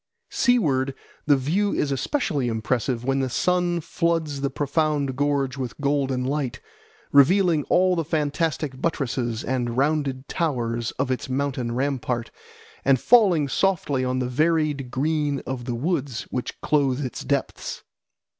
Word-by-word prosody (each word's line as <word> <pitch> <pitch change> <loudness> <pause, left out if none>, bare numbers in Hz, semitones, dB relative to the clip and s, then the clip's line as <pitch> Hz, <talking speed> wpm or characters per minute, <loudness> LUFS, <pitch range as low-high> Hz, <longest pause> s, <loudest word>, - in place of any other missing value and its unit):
Seaward 140 - +2 0.3
the 145 -2 +5
view 180 +10 0
is 140 - 0
especially 145 - -1
impressive 115 +1 -1
when 135 +1 +1
the 130 -1 0
sun 175 +4 +1
floods 160 -3 -1
the 140 - 0
profound 145 -2 0
gorge 140 -1 0
with 130 0 -5
golden 140 -3 0
light, 135 -2 -2 0.5
revealing 160 +2 +4
all 185 0 +3
the 165 - 0
fantastic 150 -2 -1
buttresses 120 -7 -1
and 120 -2 -2
rounded 140 -2 0
towers 120 -8 -1
of 130 0 0
its 130 - -3
mountain 130 -3 -1
rampart, 125 -3 -1 0.5
and 135 -2 +4
falling 185 - +5
softly 145 -3 +1
on 130 0 0
the 125 -1 -1
varied 150 -1 +1
green 145 +1 0
of 130 -2 -4
the 120 - -2
woods 140 -2 -2
which 125 - -4
clothe 140 -2 +1
its 125 - -5
depths. - - -3
140 Hz, 135 wpm, -24 LUFS, 130-155 Hz, 0.5 s, the